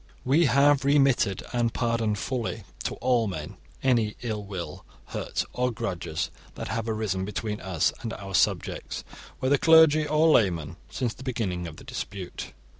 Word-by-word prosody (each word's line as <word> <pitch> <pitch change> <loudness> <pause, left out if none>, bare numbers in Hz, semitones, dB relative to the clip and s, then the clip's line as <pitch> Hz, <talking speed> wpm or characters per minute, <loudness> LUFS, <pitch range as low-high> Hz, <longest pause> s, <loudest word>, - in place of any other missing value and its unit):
We 150 +6 +4
have 140 +1 +4
remitted 135 -8 +3
and 120 -1 +1
pardoned 115 -3 +1
fully 115 -2 -3 0.2
to - - -1
all 125 -3 +2
men 80 -6 -6 0.3
any 115 -5 +2
ill 110 -3 -2
will, 95 -4 -6 0.3
hurt, - - -2
or 125 0 +1
grudges 90 -9 -3 0.2
that - - -5
have 115 0 -2
arisen 105 -4 -1
between 105 +1 -3
us 95 -4 +1
and 115 - -4
our 95 -1 -7
subjects, 85 - 0 0.4
whether 135 +1 +3
clergy 160 -2 +6
or 155 +2 +4
laymen, 85 - +2
since 120 -4 -2
the - - -15
beginning 100 -9 -2
of 80 - -9
the - - -12
dispute. 95 -3 -6
115 Hz, 155 wpm, -27 LUFS, 95-130 Hz, 0.4 s, clergy